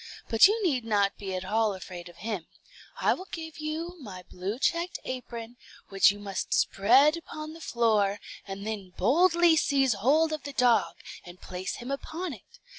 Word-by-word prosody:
But 225 Hz, +9 st, +7 dB
you 430 Hz, +3 st, 0 dB
need 275 Hz, -10 st, +1 dB
not 205 Hz, -3 st, +1 dB
be 195 Hz, -2 st, -4 dB
at 185 Hz, 0 st, -4 dB
all 215 Hz, 0 st, +1 dB
afraid 180 Hz, -1 st, -9 dB
of 175 Hz, -, -15 dB
him; 205 Hz, -7 st, -3 dB, 0.5 s
I -, -, +3 dB
will 370 Hz, -, -8 dB
give 320 Hz, -2 st, -7 dB
you 325 Hz, +3 st, -4 dB
my 185 Hz, -7 st, -9 dB
blue 185 Hz, +5 st, -5 dB
checked 340 Hz, +5 st, 0 dB
apron, 240 Hz, -2 st, -6 dB, 0.3 s
which 195 Hz, -1 st, +5 dB
you 205 Hz, -, -8 dB
must 200 Hz, -2 st, -3 dB
spread 260 Hz, +10 st, +4 dB
upon 310 Hz, -1 st, -8 dB
the 330 Hz, -, -12 dB
floor, 215 Hz, -6 st, +1 dB, 0.3 s
and 195 Hz, +1 st, -6 dB
then 200 Hz, -4 st, -5 dB
boldly 340 Hz, -, +4 dB
seize 275 Hz, -5 st, +2 dB
hold 295 Hz, +10 st, +2 dB
of 305 Hz, -, -3 dB
the 285 Hz, 0 st, -7 dB
dog, 240 Hz, -5 st, +3 dB, 0.3 s
and 175 Hz, +1 st, -12 dB
place 185 Hz, 0 st, -5 dB
him 245 Hz, +2 st, -7 dB
upon 320 Hz, +4 st, -4 dB
it. 365 Hz, -, -15 dB
235 Hz, 180 wpm, -28 LUFS, 200-310 Hz, 0.5 s, But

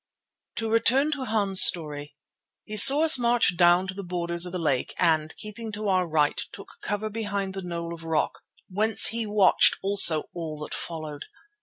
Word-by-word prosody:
To 225 Hz, -, -4 dB
return 240 Hz, +6 st, +1 dB
to 280 Hz, -3 st, -5 dB
Hans' 205 Hz, -4 st, +2 dB
story. 150 Hz, -3 st, +1 dB, 0.5 s
He 215 Hz, -, -9 dB
saw 275 Hz, +8 st, +7 dB
us 320 Hz, -5 st, +8 dB
march 235 Hz, -5 st, 0 dB
down 175 Hz, +1 st, +2 dB
to 185 Hz, -, -7 dB
the 200 Hz, +1 st, -9 dB
borders 170 Hz, -1 st, -2 dB
of -, -, -9 dB
the 185 Hz, -, -5 dB
lake, 145 Hz, -7 st, -3 dB
and, 160 Hz, -3 st, -1 dB
keeping 215 Hz, +1 st, -9 dB
to 210 Hz, 0 st, -5 dB
our 185 Hz, -2 st, 0 dB
right, 150 Hz, -2 st, -1 dB
took 200 Hz, -, -14 dB
cover 210 Hz, +1 st, -5 dB
behind 200 Hz, -3 st, -5 dB
the 195 Hz, -, -7 dB
knoll 170 Hz, -2 st, -7 dB
of 165 Hz, -1 st, -12 dB
rock, 160 Hz, -1 st, -3 dB, 0.3 s
whence 215 Hz, +4 st, 0 dB
he 230 Hz, -1 st, -5 dB
watched 205 Hz, -2 st, +3 dB
also 195 Hz, -6 st, +4 dB
all 160 Hz, -3 st, -7 dB
that -, -, -8 dB
followed. 155 Hz, -3 st, -7 dB
190 Hz, 180 wpm, -24 LUFS, 170-215 Hz, 0.5 s, us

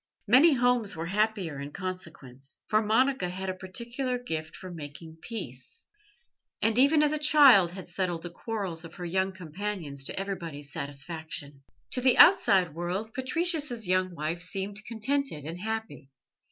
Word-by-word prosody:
Many 270 Hz, +9 st, +6 dB
homes 245 Hz, -4 st, +2 dB
were 160 Hz, +1 st, -4 dB
happier 195 Hz, -5 st, -1 dB
in 140 Hz, -, -6 dB
consequence, 160 Hz, -8 st, -7 dB
for 215 Hz, 0 st, +2 dB
Monica 225 Hz, -2 st, +2 dB
had 190 Hz, +1 st, -4 dB
a -, -, -5 dB
particular 235 Hz, +7 st, -3 dB
gift 160 Hz, -10 st, -5 dB
for 185 Hz, -, -9 dB
making 160 Hz, 0 st, -9 dB
peace, 130 Hz, -, -7 dB, 0.7 s
and 225 Hz, -1 st, +2 dB
even 295 Hz, +3 st, +5 dB
as 295 Hz, -, +3 dB
a 305 Hz, -, -1 dB
child 275 Hz, -, +6 dB
had 185 Hz, -1 st, -8 dB
settled 175 Hz, -2 st, -2 dB
the 175 Hz, -, -6 dB
quarrels 190 Hz, -4 st, -4 dB
of 165 Hz, 0 st, -11 dB
her 180 Hz, -, -6 dB
young 190 Hz, +2 st, 0 dB
companions 180 Hz, -5 st, -5 dB
to -, -, -1 dB
everybody's 165 Hz, -7 st, -6 dB
satisfaction. 145 Hz, 0 st, -4 dB, 0.3 s
To 250 Hz, -, -1 dB
the 255 Hz, 0 st, +4 dB
outside 190 Hz, -, +6 dB
world 180 Hz, +7 st, -4 dB
Patricius's 280 Hz, -, 0 dB
young 185 Hz, -1 st, +1 dB
wife 160 Hz, +2 st, -3 dB
seemed 195 Hz, +3 st, -3 dB
contented 245 Hz, -, -1 dB
and 165 Hz, +3 st, -6 dB
happy. 220 Hz, -9 st, -5 dB
190 Hz, 155 wpm, -28 LUFS, 165-230 Hz, 0.7 s, Many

